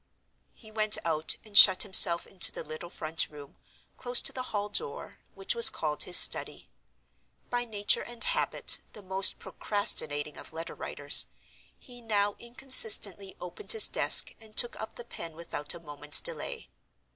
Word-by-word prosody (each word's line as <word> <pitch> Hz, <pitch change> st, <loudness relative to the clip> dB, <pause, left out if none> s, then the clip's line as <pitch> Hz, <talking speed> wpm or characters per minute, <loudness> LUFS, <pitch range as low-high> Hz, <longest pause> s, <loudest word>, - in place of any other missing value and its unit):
He 220 Hz, -2 st, -19 dB
went 215 Hz, -1 st, 0 dB
out, 155 Hz, -1 st, -4 dB
and 210 Hz, -1 st, -17 dB
shut 190 Hz, -3 st, +6 dB
himself 180 Hz, -3 st, +7 dB
into 190 Hz, -, +2 dB
the -, -, -10 dB
little 155 Hz, +2 st, -11 dB
front 160 Hz, -1 st, -4 dB
room, 145 Hz, -2 st, -17 dB, 0.4 s
close 245 Hz, -1 st, 0 dB
to -, -, -3 dB
the 255 Hz, -, -7 dB
hall 205 Hz, -1 st, -6 dB
door, 460 Hz, -, -7 dB, 0.2 s
which 390 Hz, +4 st, -3 dB
was 470 Hz, -1 st, +5 dB
called -, -, -6 dB
his -, -, +3 dB
study. -, -, +3 dB, 0.8 s
By 245 Hz, 0 st, -4 dB
nature 205 Hz, -3 st, -2 dB
and 240 Hz, 0 st, -10 dB
habit -, -, -2 dB
the 210 Hz, -, -15 dB
most 190 Hz, +1 st, 0 dB
procrastinating 155 Hz, -8 st, -3 dB
of -, -, -15 dB
letter 165 Hz, +1 st, -10 dB
writers, -, -, +1 dB, 0.5 s
he 245 Hz, -1 st, -15 dB
now 205 Hz, -3 st, -4 dB
inconsistently 220 Hz, -6 st, +2 dB
opened 180 Hz, -, -5 dB
his 445 Hz, -, +4 dB
desk -, -, +1 dB
and 215 Hz, -1 st, -19 dB
took 240 Hz, -, 0 dB
up 220 Hz, -, -11 dB
the 240 Hz, -, -13 dB
pen 165 Hz, -8 st, -11 dB
without 165 Hz, -2 st, -8 dB
a -, -, -13 dB
moment's 150 Hz, -2 st, -2 dB
delay. -, -, -5 dB
205 Hz, 160 wpm, -25 LUFS, 170-240 Hz, 0.8 s, himself